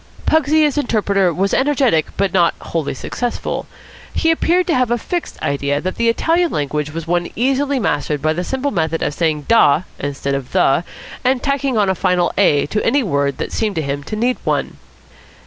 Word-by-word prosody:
Pugsy 310 0 +3
as 295 0 0
interpreter 200 -7 +1
was 195 +4 -1
energetic 265 - +2
but 195 -1 0
not 175 -3 +3
wholly 160 -5 -3
successful. 245 - -4 0.4
He 325 - +2
appeared 345 +2 +2
to 340 - 0
have 250 -4 +2
a 240 - +1
fixed 350 +8 -4
idea 140 0 0
that 185 +4 -4
the 235 0 +2
Italian 330 +8 +2
language 150 +1 -2
was 165 +1 -5
one 175 0 0
easily 270 +3 +1
mastered 150 -7 -1
by 155 +3 +1
the 175 +3 -3
simple 265 +6 -2
method 165 -3 -1
of - - -1
saying 155 -2 0
"da" 180 -5 +4 0.2
instead 140 0 -3
of 135 -2 -4
"the," 135 +5 +3 0.4
and 255 0 +1
tacking 275 -3 0
on 205 -2 +3
a 190 - +2
final 180 -2 +1
"a" 150 -8 +3
to 210 +8 -2
any 285 -1 +2
word 140 - 0
that - - -4
seemed 215 -3 -1
to 160 - -1
him 140 0 -3
to 215 - -4
need 245 +4 0
one. - - -1
195 Hz, 195 wpm, -18 LUFS, -, 0.4 s, da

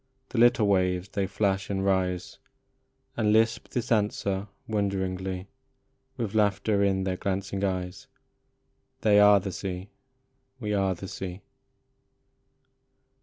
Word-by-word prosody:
The 120 - -2
little 120 -2 +5
waves 90 -1 +1
they 100 -2 -1
flash 100 0 0
and 95 -1 -1
rise, 90 -2 0 0.8
And 105 -2 +2
lisp 110 +1 +2
this 120 -2 -4
answer 100 -2 0 0.2
wonderingly, 95 -2 -2 0.7
With 115 -5 -3
laughter 105 -1 +2
in 95 -1 +1
their 95 -1 -1
glancing 100 +1 -2
eyes: 90 -2 -3 0.9
"They 105 -1 +5
are 105 0 +7
the 95 0 -5
sea 95 +1 -5 0.7
we 105 -3 -2
are 95 -2 +1
the 95 +3 -8
sea." 95 0 -6
100 Hz, 120 wpm, -27 LUFS, 95-105 Hz, 0.9 s, are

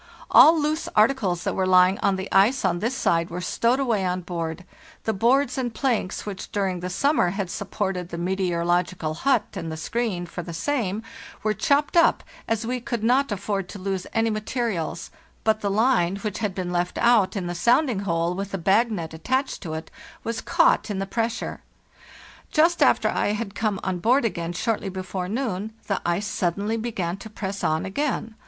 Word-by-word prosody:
All 320 +2 +8
loose 305 +2 -1
articles 210 -6 +2
that - - -1
were 190 -1 0
lying 185 +1 +5
on 195 - +2
the 190 +1 -4
ice 210 +6 +4
on 175 -2 +1
this 235 +6 -1
side 165 -7 +1
were 175 - -4
stowed 235 +8 +1
away 230 -7 +1
on 180 0 -1
board; 170 0 -4 0.4
the 220 - 0
boards 255 +6 +2
and 245 -2 -1
planks 240 -8 -1
which, 200 -2 -6
during 195 -4 -1
the 180 +1 -4
summer, 195 - +2
had 190 -1 -3
supported 190 -3 -3
the 170 - -5
meteor 180 -1 -1
ological 175 -2 0
hut 260 - +2
and 165 - -5
the 160 - -5
screen 200 0 -2
for 175 +1 -6
the 170 -1 -7
same 220 - -1 0.4
were 215 0 +2
chopped 290 +3 +1
up, 335 -1 +4 0.2
as 225 0 -1
we 250 +2 -2
could 235 -3 -4
not 255 +3 +3
afford 200 -1 -2
to - - -7
lose 190 -1 -3
any 225 0 +1
materials; 215 -5 -3 0.3
but 220 0 +2
the 200 - 0
line, 200 -4 +2
which 210 0 -4
had 205 -4 -2
been 180 -2 -3
left 175 0 -1
out 235 -5 +4
in 190 -3 -2
the 175 - -3
sounding 240 - +2
hole 170 -3 0
with 195 +2 -4
the 195 - -3
bag 200 +7 +3
net 165 -6 -4
attached 260 - -1
to 160 -4 -5
it, 160 - -7 0.3
was 230 0 -3
caught - - +3
in 205 - -2
the 195 - -1
pressure. 230 +3 -3 0.9
Just 330 +1 +3
after 225 - +4
I 205 - 0
had 210 -2 -4
come 210 -2 -1
on 185 -2 -2
board 245 +6 +3
again 175 -5 -2
short 225 +5 -1
ly 195 - -4
before 185 -1 -4
noon 220 -3 -2
the 195 - -1
ice 175 +4 0
suddenly 200 +3 -1
began 210 -6 -3
to 220 - -10
press 200 -2 -5
on 155 +1 +1
again. 225 +1 -2
200 Hz, 195 wpm, -24 LUFS, 180-235 Hz, 0.9 s, All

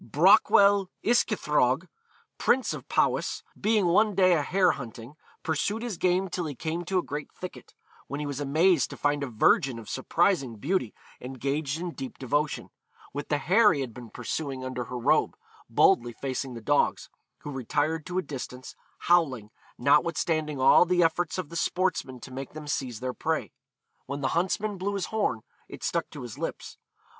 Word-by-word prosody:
Brochwel 200 - +5 0.2
Yscythrog, 240 +2 +2 0.5
prince 260 0 +2
of - - -9
Powys, - - +1
being 215 -2 +2
one 205 +4 +3
day 185 -1 +5
a 160 - +2
hare 180 +4 +3
hunting, 120 -1 -8 0.3
pursued 195 +8 -1
his 230 -8 -4
game 185 +1 +2
till 175 -2 -3
he 145 - -6
came 165 +5 -3
to 190 +2 0
a 180 - +1
great 145 +1 -6
thicket; 185 - -10 0.3
when 140 - -4
he 150 - -3
was 140 -1 -4
amazed 155 +4 +3
to - - -9
find 145 0 0
a 140 - -2
virgin 125 +2 +2
of 115 -2 -10
surprising 135 - +1
beauty 140 - -1 0.2
engaged 135 +4 -3
in 175 0 -4
deep 135 -5 -7
devotion, 145 +3 -1 0.4
with 145 +1 -5
the 150 - +2
hare 195 +7 +4
he 145 - -2
had 125 -4 -5
been 120 -1 -10
pursuing 130 +2 -4
under 125 -1 -4
her 125 +2 -6
robe, 120 - +2 0.3
boldly 120 0 +3
facing 130 +1 -4
the 115 - -7
dogs, 145 +5 +1 0.3
who 145 - -6
retired 145 +5 -1
to 180 0 -3
a 185 - +1
distance, 130 -2 -7 0.3
howling, 135 -12 +2 0.3
notwithstanding 150 +1 +1
all 130 - +7
the 175 0 +2
efforts 165 +1 0
of 180 -5 -4
the 170 - -9
sportsmen 180 -8 -1
to 130 - -11
make 135 +1 -7
them 155 0 -8
seize 130 -6 -3
their 130 0 -2
prey. - - -2 0.6
When 140 +1 -4
the 130 - 0
huntsman 195 +5 -1
blew 200 +2 -2
his 195 -2 -1
horn, 205 - 0 0.3
it - - -10
stuck - - -1
to - - -9
his 120 -3 -8
lips. - - -5
150 Hz, 175 wpm, -27 LUFS, 130-180 Hz, 0.6 s, all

